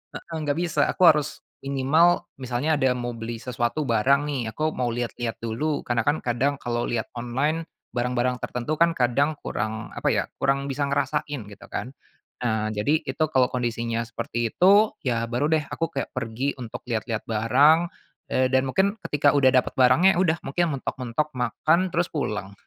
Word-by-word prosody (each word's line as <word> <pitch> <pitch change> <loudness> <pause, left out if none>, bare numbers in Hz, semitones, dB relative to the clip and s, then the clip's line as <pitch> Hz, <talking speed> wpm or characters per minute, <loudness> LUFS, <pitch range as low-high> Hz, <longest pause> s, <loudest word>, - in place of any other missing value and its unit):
heeh, 165 - -7
enggak 145 0 -1
bisa. 170 -4 0
Aku 185 - -1
harus 150 -1 +3 0.2
minimal 140 +6 +3
misalnya 130 +4 0
ada 130 -2 +2
mau 120 -1 -4
beli 115 0 -5
sesuatu 120 +3 -1
barang 130 +5 +3
nih, 140 -3 -2
aku 155 - -5
mau 125 -1 0
lihat-lihat 120 -1 -3
dulu, 125 +7 -2
karena 120 -1 +1
kan 150 +2 +3
kadang 125 +4 +1
kalau 120 0 -2
lihat 115 -2 -2
online 140 +7 -1 0.3
barang-barang 125 +1 0
tertentu 125 +6 -3
kan 170 +1 +4
kadang 140 +3 +1
kurang 110 -2 -4
apa - - -3
ya, - - +1
kurang 135 +1 0
bisa 140 +1 -2
ngerasain 145 0 -1
gitu 105 +3 -13
kan. 130 +2 -5 0.4
Nah, 110 -3 -1
jadi 110 +9 +1
itu 145 +2 -2
kalau 130 -1 +4
kondisinya 115 -1 -2
seperti 115 0 -3
itu, 200 +4 +5
ya 115 -3 0
baru 125 +6 -1
deh 160 -1 +2
aku 165 0 -1
kayak 140 -4 -4
pergi 130 +3 -2
untuk 115 0 -7
lihat-lihat 115 -1 -3
barang, 125 +9 +4 0.5
eee, 130 0 +2
dan 130 - +5
mungkin 195 +8 +2
ketika 145 -1 +2
udah 140 -2 +5
dapet 130 -1 +2
barangnya, 130 +10 +5
udah, 165 -3 +2
mungkin 155 +1 0
mentok-mentok 130 +4 -3
makan 160 +8 +1
terus 175 +1 +1
pulang. 100 - -3
130 Hz, 170 wpm, -25 LUFS, 120-150 Hz, 0.5 s, itu